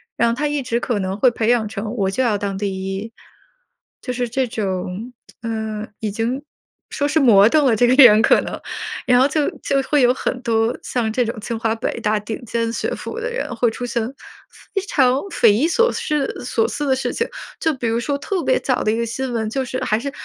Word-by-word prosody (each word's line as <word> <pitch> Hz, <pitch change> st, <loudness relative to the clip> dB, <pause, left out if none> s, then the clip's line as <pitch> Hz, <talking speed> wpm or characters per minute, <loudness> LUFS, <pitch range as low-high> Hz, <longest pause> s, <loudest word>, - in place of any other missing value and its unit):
然 235 Hz, -, +2 dB
后 230 Hz, -, +1 dB
他 295 Hz, +3 st, -1 dB
一 290 Hz, -2 st, -2 dB
直 235 Hz, -2 st, -1 dB
可 240 Hz, -2 st, -1 dB
能 190 Hz, 0 st, -2 dB
会 250 Hz, +4 st, +5 dB
培 230 Hz, -2 st, -2 dB
养 235 Hz, -3 st, +2 dB
成 210 Hz, +1 st, -5 dB
我 195 Hz, -5 st, 0 dB
就 255 Hz, +7 st, 0 dB
要 225 Hz, -4 st, +2 dB
当 200 Hz, -1 st, -3 dB
第 195 Hz, -1 st, -3 dB
1， 215 Hz, +4 st, -6 dB, 0.9 s
就 250 Hz, -, -4 dB
是 245 Hz, 0 st, -1 dB
这 255 Hz, +2 st, -1 dB
种 200 Hz, +1 st, -4 dB, 0.3 s
呃， 220 Hz, -2 st, -3 dB
已 215 Hz, -, -2 dB
经 235 Hz, +6 st, -2 dB, 0.5 s
说 285 Hz, -, -1 dB
是 305 Hz, +2 st, +2 dB
魔 215 Hz, -7 st, +7 dB
怔 295 Hz, +3 st, +3 dB
了 235 Hz, -, +4 dB
这 245 Hz, -, +4 dB
个 245 Hz, -, +4 dB
人 215 Hz, -3 st, +8 dB
可 -, -, +5 dB
能， -, -, -6 dB, 0.5 s
然 245 Hz, -1 st, +4 dB
后 265 Hz, -, +5 dB
就 290 Hz, +1 st, 0 dB
就 275 Hz, -, 0 dB
会 290 Hz, +1 st, +2 dB
有 245 Hz, -1 st, +5 dB
很 255 Hz, -1 st, -3 dB
多 225 Hz, 0 st, +1 dB
像 225 Hz, -3 st, -2 dB
这 250 Hz, -, +2 dB
种 230 Hz, -1 st, -4 dB
清 225 Hz, +2 st, -4 dB
华 225 Hz, 0 st, 0 dB
北 230 Hz, 0 st, -3 dB
大 215 Hz, -1 st, +1 dB
顶 215 Hz, +3 st, -6 dB
尖 230 Hz, 0 st, -1 dB
学 -, -, -2 dB
府 460 Hz, -, -6 dB
的 -, -, -3 dB
人 475 Hz, -, -3 dB
会 235 Hz, 0 st, +2 dB
出 245 Hz, +2 st, -5 dB
现 235 Hz, -2 st, -1 dB, 0.7 s
非 390 Hz, -, +1 dB
常 260 Hz, -1 st, +3 dB
匪 230 Hz, -, +4 dB
夷 250 Hz, +10 st, +2 dB
所 470 Hz, +8 st, +3 dB
失 300 Hz, -3 st, -1 dB, 0.2 s
所 225 Hz, -2 st, +1 dB
思 290 Hz, +4 st, -3 dB
的 265 Hz, -, +3 dB
事 255 Hz, -2 st, -2 dB
情。 465 Hz, -, -1 dB, 0.3 s
就 320 Hz, -, +1 dB
比 250 Hz, -, -5 dB
如 230 Hz, +1 st, +1 dB
说 280 Hz, +4 st, -1 dB
特 360 Hz, +4 st, -2 dB
别 -, -, +2 dB
早 -, -, 0 dB
的 215 Hz, -, +2 dB
一 225 Hz, -, -1 dB
个 235 Hz, -, 0 dB
新 255 Hz, +3 st, -3 dB
闻， 220 Hz, -2 st, -1 dB
就 270 Hz, +2 st, -1 dB
是 255 Hz, +1 st, -4 dB
还 215 Hz, -, +1 dB
是 280 Hz, +3 st, -4 dB
235 Hz, 250 characters per minute, -20 LUFS, 220-265 Hz, 0.9 s, 人